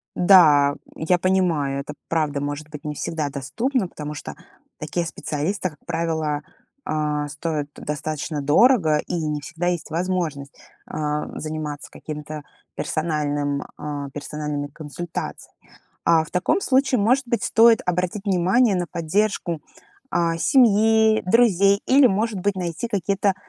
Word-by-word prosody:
Да, 150 Hz, -7 st, +6 dB, 0.2 s
я 170 Hz, +3 st, +1 dB
понимаю, 175 Hz, -7 st, +1 dB
это 145 Hz, +1 st, -6 dB, 0.2 s
правда 150 Hz, -3 st, 0 dB
может 145 Hz, +1 st, -4 dB
быть 150 Hz, -2 st, -9 dB
не 150 Hz, -1 st, -4 dB
всегда 155 Hz, 0 st, -2 dB
доступно, 215 Hz, -, -1 dB
потому 150 Hz, -3 st, -7 dB
что 150 Hz, -, -7 dB, 0.4 s
такие 160 Hz, +3 st, -2 dB
специалисты, 165 Hz, +4 st, -2 dB
как 150 Hz, -2 st, -21 dB
правило, 160 Hz, -3 st, -1 dB, 0.4 s
а, 150 Hz, -, -1 dB
стоят 150 Hz, 0 st, -3 dB
достаточно 150 Hz, 0 st, -4 dB
дорого, 160 Hz, -, +4 dB
и -, -, -2 dB
не 155 Hz, -3 st, -2 dB
всегда 165 Hz, +4 st, -4 dB
есть 175 Hz, -2 st, -2 dB
возможность, 160 Hz, -5 st, -2 dB, 0.3 s
а, 150 Hz, 0 st, -2 dB
заниматься 155 Hz, -2 st, -5 dB
каким-то 150 Hz, 0 st, -7 dB, 0.3 s
персональным 145 Hz, -3 st, -1 dB
а, 145 Hz, -2 st, -5 dB
персональными 150 Hz, 0 st, -4 dB
консультациями. 155 Hz, +3 st, -7 dB, 0.3 s
А, 160 Hz, -1 st, +4 dB
в -, -, -14 dB
таком 180 Hz, -, +1 dB
случае, 265 Hz, -2 st, +2 dB
может 250 Hz, +6 st, +2 dB
быть, 235 Hz, 0 st, -1 dB
стоит 225 Hz, 0 st, +5 dB
обратить 180 Hz, +3 st, -1 dB
внимание 195 Hz, +4 st, +3 dB
на 175 Hz, -1 st, -1 dB
поддержку, 170 Hz, -1 st, -1 dB, 0.5 s
а, 165 Hz, -1 st, +1 dB
семьи, 220 Hz, -1 st, +4 dB
друзей 200 Hz, -2 st, +4 dB
или, 270 Hz, +1 st, +6 dB
может 215 Hz, -1 st, 0 dB
быть, 200 Hz, +2 st, 0 dB
найти 175 Hz, +4 st, -3 dB
какие-то 200 Hz, -2 st, 0 dB
165 Hz, 130 wpm, -23 LUFS, 150-195 Hz, 0.5 s, Да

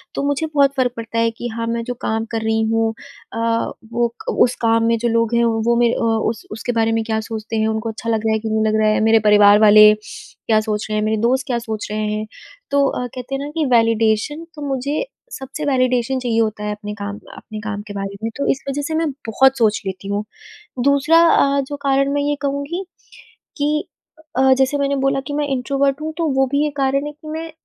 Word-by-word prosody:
तो -, -, -1 dB
मुझे 285 Hz, +2 st, 0 dB
बहुत 280 Hz, -1 st, +4 dB
फ़र्क 255 Hz, -2 st, +2 dB
पड़ता 230 Hz, 0 st, -3 dB
है 230 Hz, 0 st, +2 dB
कि 235 Hz, +2 st, -6 dB
हाँ, 230 Hz, 0 st, -4 dB
मैं 230 Hz, 0 st, -2 dB
जो 245 Hz, -, -3 dB
काम 225 Hz, 0 st, -1 dB
कर 225 Hz, -1 st, -2 dB
रही 220 Hz, 0 st, +1 dB
हूँ 225 Hz, 0 st, +1 dB, 0.4 s
अ, -, -, -5 dB, 0.6 s
वो 240 Hz, 0 st, +2 dB, 0.2 s
क -, -, -5 dB
उस 245 Hz, -, +3 dB
काम 230 Hz, 0 st, +3 dB
में 230 Hz, 0 st, +2 dB
जो 240 Hz, -, 0 dB
लोग 230 Hz, 0 st, +1 dB
हैं 235 Hz, -, +3 dB
वो 230 Hz, +1 st, +1 dB
मेरे 240 Hz, -1 st, +3 dB
अ, -, -, -2 dB, 0.3 s
उस 225 Hz, -1 st, -6 dB
उसके 220 Hz, +3 st, -3 dB
बारे 225 Hz, -1 st, +1 dB
में 225 Hz, 0 st, 0 dB
क्या 220 Hz, -1 st, -1 dB
सोचते 220 Hz, 0 st, -6 dB
हैं, 220 Hz, 0 st, +1 dB
उनको 220 Hz, +1 st, -2 dB
अच्छा 225 Hz, +1 st, -5 dB
लग 220 Hz, -1 st, 0 dB
रहा 220 Hz, -, +2 dB
है 220 Hz, -, +1 dB
कि 220 Hz, 0 st, -4 dB
नहीं 220 Hz, 0 st, +1 dB
लग 215 Hz, 0 st, +1 dB
रहा 215 Hz, -, +4 dB
है, 215 Hz, -, +2 dB
मेरे 225 Hz, 0 st, +5 dB
परिवार 205 Hz, 0 st, +7 dB
वाले 215 Hz, 0 st, +8 dB
क्या 220 Hz, 0 st, -2 dB
सोच 215 Hz, -1 st, -3 dB
रहे 215 Hz, -, -1 dB
हैं, 210 Hz, -, 0 dB
मेरे 220 Hz, 0 st, 0 dB
दोस्त 260 Hz, +3 st, +1 dB
क्या 245 Hz, -3 st, 0 dB
सोच 220 Hz, -3 st, -5 dB
रहे 215 Hz, 0 st, -2 dB
हैं। 215 Hz, 0 st, -3 dB, 0.5 s
तो 280 Hz, 0 st, +3 dB
अ, 250 Hz, -, -2 dB
कहते 255 Hz, +2 st, -6 dB
हैं 270 Hz, -, -3 dB
ना -, -, -6 dB
कि 315 Hz, -, +1 dB
वैलिडेशन 230 Hz, +6 st, +2 dB
तो 300 Hz, -, -9 dB
मुझे 280 Hz, -, -2 dB, 0.3 s
सबसे 270 Hz, +3 st, -6 dB
वैलिडेशन 255 Hz, -2 st, +1 dB
चाहिए 240 Hz, -3 st, 0 dB
होता 215 Hz, -1 st, -2 dB
है 210 Hz, -, -2 dB
अपने 210 Hz, 0 st, -6 dB
काम 205 Hz, 0 st, -5 dB
का -, -, -16 dB
अपने 215 Hz, -2 st, -9 dB
काम 210 Hz, -1 st, -4 dB
के 205 Hz, -, -7 dB
बारे 195 Hz, 0 st, -5 dB
में। 225 Hz, -, -1 dB
तो 280 Hz, -, -1 dB
इस 270 Hz, -, -4 dB
वज़ह 285 Hz, +1 st, -2 dB
से 315 Hz, -, -2 dB
मैं 320 Hz, -1 st, +1 dB, 0.2 s
बहुत 265 Hz, +4 st, +3 dB
सोच 220 Hz, -3 st, +2 dB
लेती 190 Hz, 0 st, -5 dB
हूँ। 200 Hz, +1 st, -1 dB, 0.6 s
दूसरा 280 Hz, +4 st, +4 dB
अ, 280 Hz, -3 st, +3 dB
जो 275 Hz, +2 st, -6 dB
कारण 275 Hz, 0 st, +2 dB
मैं 285 Hz, -, +1 dB
ये 290 Hz, 0 st, 0 dB
कहूँगी 285 Hz, +6 st, -3 dB, 0.7 s
कि 300 Hz, +1 st, 0 dB, 0.5 s
अ, 265 Hz, 0 st, +5 dB
जैसे 265 Hz, +2 st, +2 dB
मैंने 280 Hz, 0 st, 0 dB
बोला 270 Hz, 0 st, +2 dB
कि 290 Hz, -, -4 dB
मैं 295 Hz, 0 st, -1 dB
इंट्रोवर्ट 275 Hz, +1 st, 0 dB
हूँ, 315 Hz, +1 st, -4 dB
तो 335 Hz, -1 st, 0 dB
वो 270 Hz, 0 st, +3 dB
भी 295 Hz, +1 st, +2 dB
एक 290 Hz, -, -7 dB
कारण 275 Hz, +1 st, +1 dB
है -, -, -5 dB
कि 300 Hz, +1 st, -15 dB
मैं 320 Hz, +1 st, -5 dB
235 Hz, 240 wpm, -19 LUFS, 220-275 Hz, 0.7 s, वाले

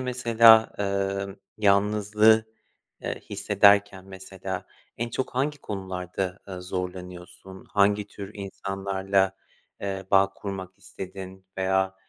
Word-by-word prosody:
mesela, 115 Hz, -3 st, +5 dB
eee, 100 Hz, -1 st, -1 dB, 0.3 s
yalnızlığı, 105 Hz, +2 st, +4 dB, 0.6 s
eee, -, -, -4 dB
hissederken 100 Hz, -1 st, +3 dB
mesela 95 Hz, -1 st, -7 dB, 0.3 s
en 120 Hz, +1 st, -2 dB
çok 130 Hz, -, -3 dB
hangi 145 Hz, +3 st, 0 dB
konularda, 95 Hz, -1 st, -4 dB
eee, 95 Hz, -2 st, -6 dB
zorlanıyorsun? 90 Hz, 0 st, -7 dB
Hangi 100 Hz, 0 st, +2 dB
tür 100 Hz, -1 st, -9 dB
insanlarla, 95 Hz, -1 st, -1 dB, 0.4 s
eee, 95 Hz, -1 st, -4 dB
bağ 95 Hz, 0 st, +4 dB
kurmak 95 Hz, -2 st, -7 dB
istedin 95 Hz, 0 st, -9 dB
veya, 95 Hz, 0 st, +1 dB
95 Hz, 100 wpm, -26 LUFS, 95-105 Hz, 0.6 s, mesela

